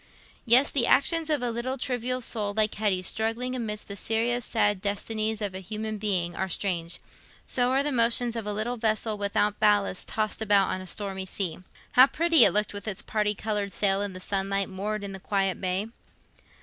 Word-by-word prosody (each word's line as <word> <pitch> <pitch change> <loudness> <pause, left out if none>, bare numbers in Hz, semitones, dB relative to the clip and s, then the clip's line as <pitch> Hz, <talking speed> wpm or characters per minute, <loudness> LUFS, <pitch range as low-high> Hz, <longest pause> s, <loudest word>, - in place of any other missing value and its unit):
Yes, 250 +5 +6
the 250 -4 +3
actions 325 +2 +3
of 295 -5 +1
a 240 - 0
little 245 +3 -3
trivial 255 0 -1
soul 210 -4 -3
like 215 -1 +2
Hetty's, 195 -4 0
struggling 225 +5 -1
amidst 215 -4 -4
the 200 - -6
serious 230 +4 0
sad 205 -4 +1
destinies 215 +2 -2
of 200 -2 -3
a 190 - -5
human 215 +2 -5
being, 180 -5 -1
are 190 - -2
strange. 175 -3 -1 0.5
So 245 -1 +1
are 270 +2 +2
the 295 - -1
motions 235 -1 +2
of 225 -2 -4
a - - -1
little 220 +4 -2
vessel 220 -1 0
without 205 0 0
ballast 205 -3 +2
tossed 215 0 -2
about 205 -2 +3
on 185 - -3
a 185 - -9
stormy 190 0 -4
sea. 185 -4 -2 0.3
How 255 +2 +7
pretty 330 +3 +4
it - - +5
looked 210 0 +1
with 205 +1 -7
its 205 -3 -3
parti 210 -1 0
coloured 205 -1 -2
sail 195 -1 +1
in 205 -2 -3
the 185 - -7
sunlight, 195 +1 -1
moored 205 +2 -4
in 200 - -5
the 195 - -8
quiet 195 -1 -1
bay! 185 +2 0
210 Hz, 200 wpm, -27 LUFS, 195-235 Hz, 0.5 s, How